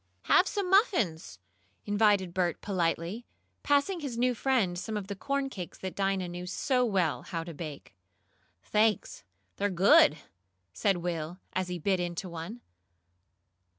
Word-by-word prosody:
"Have 370 Hz, -, +5 dB
some 405 Hz, -3 st, -2 dB
muffins," 235 Hz, -, +2 dB, 0.5 s
invited 205 Hz, -3 st, +2 dB
Bert 175 Hz, -2 st, 0 dB
politely, 180 Hz, +3 st, -2 dB, 0.3 s
passing 290 Hz, +6 st, +2 dB
his 275 Hz, -7 st, -5 dB
new 250 Hz, +1 st, +2 dB
friend 225 Hz, -8 st, +1 dB
some 215 Hz, +2 st, -4 dB
of 205 Hz, -, -4 dB
the 200 Hz, +1 st, -5 dB
corn 275 Hz, +7 st, -1 dB
cakes 185 Hz, -10 st, -7 dB
that 190 Hz, -1 st, -5 dB
Dinah 195 Hz, -2 st, 0 dB
knew 175 Hz, +1 st, -6 dB
so 250 Hz, +7 st, +1 dB
well 190 Hz, -9 st, +1 dB
how 165 Hz, -1 st, -4 dB
to 170 Hz, 0 st, -8 dB
bake. 150 Hz, -7 st, -8 dB, 0.7 s
"Thanks! 215 Hz, 0 st, +1 dB, 0.3 s
They're 205 Hz, +1 st, +1 dB
good!" 180 Hz, -4 st, +6 dB, 0.6 s
said 180 Hz, -, +1 dB
Will, 170 Hz, -1 st, -4 dB, 0.2 s
as 185 Hz, -1 st, -1 dB
he 180 Hz, 0 st, -3 dB
bit 190 Hz, +3 st, 0 dB
into 175 Hz, +1 st, -3 dB
one. 170 Hz, +8 st, -7 dB
190 Hz, 145 wpm, -29 LUFS, 175-235 Hz, 0.7 s, good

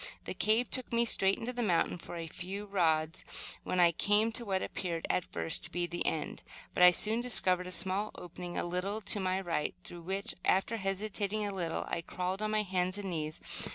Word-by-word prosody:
The -, -, -4 dB
cave 220 Hz, +3 st, +2 dB
took 255 Hz, -, +3 dB
me 235 Hz, 0 st, +3 dB
straight 195 Hz, -3 st, +3 dB
into 245 Hz, +2 st, -4 dB
the 245 Hz, -, -2 dB
mountain 180 Hz, -4 st, +1 dB
for 175 Hz, -, -8 dB
a 165 Hz, -1 st, -4 dB
few 185 Hz, +5 st, -6 dB
rods, 160 Hz, -5 st, +1 dB, 0.4 s
when 185 Hz, -, -1 dB
I 175 Hz, -1 st, +7 dB
came 210 Hz, +6 st, +2 dB
to 235 Hz, +2 st, 0 dB
what 190 Hz, -4 st, -1 dB
appeared 170 Hz, -3 st, -3 dB
at 180 Hz, -, +1 dB
first 80 Hz, -, -1 dB
to -, -, -9 dB
be 175 Hz, 0 st, 0 dB
the 175 Hz, 0 st, -2 dB
end; 160 Hz, -, -2 dB, 0.3 s
but -, -, 0 dB
I 180 Hz, -, +11 dB
soon 215 Hz, +6 st, +1 dB
discovered 185 Hz, -7 st, +3 dB
a -, -, -6 dB
small 190 Hz, +3 st, +2 dB
opening 175 Hz, 0 st, -7 dB
a -, -, +1 dB
little 180 Hz, +4 st, -1 dB
to 205 Hz, +1 st, -1 dB
my 185 Hz, 0 st, 0 dB
right, 165 Hz, -, -1 dB
through 175 Hz, -, -8 dB
which, 195 Hz, +3 st, -2 dB
after 195 Hz, +4 st, +2 dB
hesitating 205 Hz, +1 st, -1 dB
a 200 Hz, -, -2 dB
little, 170 Hz, -4 st, -1 dB
I 170 Hz, -, -2 dB
crawled 185 Hz, +3 st, -3 dB
on 215 Hz, -, 0 dB
my 215 Hz, 0 st, +1 dB
hands 185 Hz, -1 st, 0 dB
and 200 Hz, -2 st, -4 dB
knees. 155 Hz, -2 st, -3 dB
190 Hz, 215 wpm, -32 LUFS, 175-210 Hz, 0.4 s, I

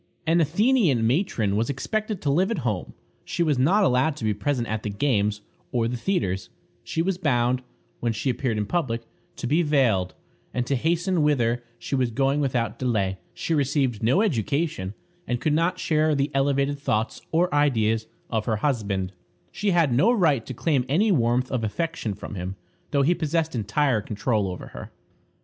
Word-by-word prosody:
An 165 Hz, +1 st, +3 dB
Athenian 170 Hz, -, +3 dB
matron 115 Hz, -, +1 dB
was 115 Hz, +2 st, 0 dB
expected 215 Hz, -, -2 dB
to 140 Hz, -, +2 dB
live 180 Hz, +7 st, +2 dB
at 170 Hz, -, -3 dB
home. 105 Hz, -6 st, -2 dB, 0.3 s
She 170 Hz, -, -1 dB
was 150 Hz, -5 st, +1 dB
not 185 Hz, +11 st, +4 dB
allowed 135 Hz, -1 st, +2 dB
to 150 Hz, -, -8 dB
be 110 Hz, -1 st, +2 dB
present 120 Hz, +3 st, -1 dB
at 110 Hz, 0 st, -2 dB
the 105 Hz, -, -3 dB
games 105 Hz, -2 st, 0 dB, 0.3 s
or 115 Hz, -2 st, +1 dB
the 125 Hz, -, -2 dB
theatres; 115 Hz, -, -1 dB, 0.3 s
she 165 Hz, -, -1 dB
was 185 Hz, 0 st, -1 dB
bound, 125 Hz, -5 st, +1 dB, 0.4 s
when 120 Hz, -, 0 dB
she 110 Hz, +4 st, -3 dB
appeared 120 Hz, -3 st, -1 dB
in 105 Hz, -, 0 dB
public, 120 Hz, -5 st, -1 dB, 0.3 s
to -, -, -6 dB
be 150 Hz, +7 st, +3 dB
veiled, 125 Hz, -, +2 dB, 0.4 s
and 125 Hz, -1 st, 0 dB
to 140 Hz, -, 0 dB
hasten 170 Hz, +5 st, +1 dB
whither 120 Hz, -5 st, +2 dB
she -, -, -7 dB
was 130 Hz, -3 st, +2 dB
going 135 Hz, +4 st, +1 dB
without 120 Hz, -5 st, -1 dB
delay; 100 Hz, -7 st, 0 dB, 0.2 s
she 165 Hz, -, -2 dB
received 140 Hz, -5 st, +1 dB
no 130 Hz, -, +3 dB
education, 140 Hz, -, -1 dB, 0.3 s
and 120 Hz, -1 st, -1 dB
could 150 Hz, -, +1 dB
not 170 Hz, +4 st, +1 dB
share 155 Hz, -3 st, +2 dB
the 140 Hz, +1 st, 0 dB
elevated 140 Hz, +1 st, +1 dB
thoughts 110 Hz, -4 st, -1 dB
or 175 Hz, +1 st, +2 dB
ideas 115 Hz, -7 st, +2 dB, 0.2 s
of 110 Hz, -2 st, 0 dB
her 110 Hz, -, +2 dB
husband; 105 Hz, -7 st, -1 dB, 0.4 s
she 205 Hz, -, -1 dB
had 170 Hz, -8 st, +3 dB
no 185 Hz, -, +4 dB
right 160 Hz, -, +2 dB
to 130 Hz, -, -4 dB
claim 140 Hz, -1 st, +1 dB
any 200 Hz, +10 st, +3 dB
warmth 125 Hz, -4 st, +2 dB
of 125 Hz, -3 st, -1 dB
affection 115 Hz, -, -2 dB
from 105 Hz, -, -8 dB
him, 95 Hz, 0 st, -4 dB, 0.3 s
though 140 Hz, -1 st, +2 dB
he 165 Hz, +6 st, +4 dB
possessed 160 Hz, -1 st, -1 dB
entire 115 Hz, +2 st, +1 dB
control 105 Hz, 0 st, -1 dB
over 90 Hz, -1 st, -6 dB
her. -, -, -9 dB
135 Hz, 180 wpm, -25 LUFS, 110-160 Hz, 0.4 s, not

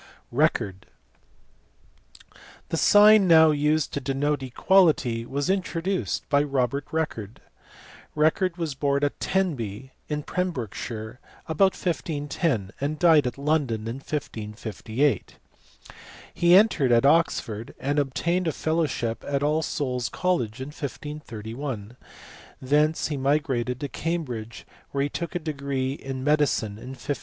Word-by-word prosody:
Record. 115 Hz, -, 0 dB, 1.8 s
The 165 Hz, -, -1 dB
sign 210 Hz, +2 st, +7 dB
now 160 Hz, -2 st, +7 dB
used 150 Hz, +1 st, +1 dB
to 140 Hz, -, -2 dB
denote 140 Hz, +2 st, -1 dB
equality 130 Hz, -4 st, +2 dB
was 140 Hz, +1 st, -2 dB
in 190 Hz, 0 st, +2 dB
troduced 185 Hz, +2 st, -2 dB
by 145 Hz, -1 st, +3 dB
Robert 140 Hz, -1 st, -1 dB
Record*. 115 Hz, -10 st, -3 dB, 0.8 s
Record 165 Hz, +4 st, +2 dB
was 165 Hz, -4 st, -2 dB
born 140 Hz, +1 st, 0 dB
at 145 Hz, -, -1 dB
Tenby 130 Hz, -, -2 dB, 0.2 s
in 150 Hz, -1 st, -2 dB
Pembrokeshire 120 Hz, -, -4 dB, 0.3 s
about 185 Hz, +4 st, +2 dB
1510 145 Hz, -, -2 dB
and 145 Hz, +2 st, -1 dB
died 155 Hz, -5 st, +5 dB
at 125 Hz, -, -5 dB
London 140 Hz, -7 st, 0 dB
in 115 Hz, +3 st, -4 dB
1558. 115 Hz, -1 st, -3 dB, 1.0 s
He 175 Hz, +1 st, +5 dB
entered 185 Hz, -, +4 dB
at 120 Hz, +2 st, +4 dB
Oxford, 135 Hz, -8 st, +1 dB
and 145 Hz, +2 st, 0 dB
obtained 170 Hz, +6 st, 0 dB
a -, -, +2 dB
fellowship 155 Hz, -9 st, -1 dB
at 140 Hz, 0 st, 0 dB
All 155 Hz, +2 st, +2 dB
Souls 125 Hz, -6 st, -2 dB
College 135 Hz, -11 st, -1 dB
in 130 Hz, +2 st, -5 dB
1531; 125 Hz, -5 st, -6 dB, 0.6 s
thence 150 Hz, +5 st, +1 dB
he 150 Hz, -, -2 dB
migrated 130 Hz, -3 st, 0 dB
to 145 Hz, -, -3 dB
Cambridge, 125 Hz, -7 st, -4 dB, 0.2 s
where 140 Hz, 0 st, -1 dB
he 145 Hz, -, -1 dB
took 170 Hz, +4 st, -5 dB
a -, -, +3 dB
degree 140 Hz, -5 st, -2 dB
in 135 Hz, -2 st, -6 dB
medicine 140 Hz, -8 st, +1 dB
in 130 Hz, +3 st, -8 dB
1545. 145 Hz, -, -3 dB
145 Hz, 125 wpm, -25 LUFS, 125-160 Hz, 1.8 s, sign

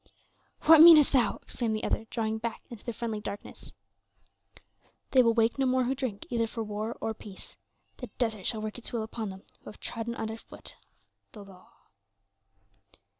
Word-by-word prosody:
"What 320 Hz, 0 st, +8 dB
meanest 320 Hz, -3 st, +9 dB
thou?" 245 Hz, -6 st, +3 dB
exclaimed 225 Hz, -3 st, -2 dB
the 215 Hz, -, -4 dB
other, 225 Hz, -, -1 dB
drawing 220 Hz, -1 st, -2 dB
back 230 Hz, 0 st, -5 dB
into 230 Hz, -3 st, -10 dB
the 235 Hz, -, -4 dB
friendly 225 Hz, -2 st, -4 dB
darkness. 205 Hz, -, -7 dB, 1.4 s
"They 260 Hz, -, +6 dB
will 230 Hz, -2 st, +3 dB
wake 230 Hz, +3 st, +2 dB
no 265 Hz, -, +2 dB
more 255 Hz, 0 st, +2 dB
who 250 Hz, +2 st, 0 dB
drink, 255 Hz, -7 st, -4 dB
either 230 Hz, -1 st, +1 dB
for 225 Hz, 0 st, -5 dB
war 215 Hz, +2 st, -4 dB
or 225 Hz, -, -2 dB
peace; 205 Hz, -3 st, -12 dB, 0.4 s
the 250 Hz, -, -7 dB
desert 220 Hz, -6 st, -1 dB
shall 220 Hz, -2 st, -1 dB
work 215 Hz, +2 st, -5 dB
its 245 Hz, -, -6 dB
will 230 Hz, -2 st, -2 dB
upon 220 Hz, -1 st, -5 dB
them 190 Hz, 0 st, -10 dB, 0.2 s
who -, -, -35 dB
have 210 Hz, -, -13 dB
trodden 230 Hz, 0 st, -5 dB
under 220 Hz, -1 st, -4 dB
foot -, -, -12 dB, 0.6 s
the 205 Hz, -2 st, -11 dB
law." 185 Hz, -2 st, -17 dB
225 Hz, 175 wpm, -29 LUFS, 215-245 Hz, 1.4 s, meanest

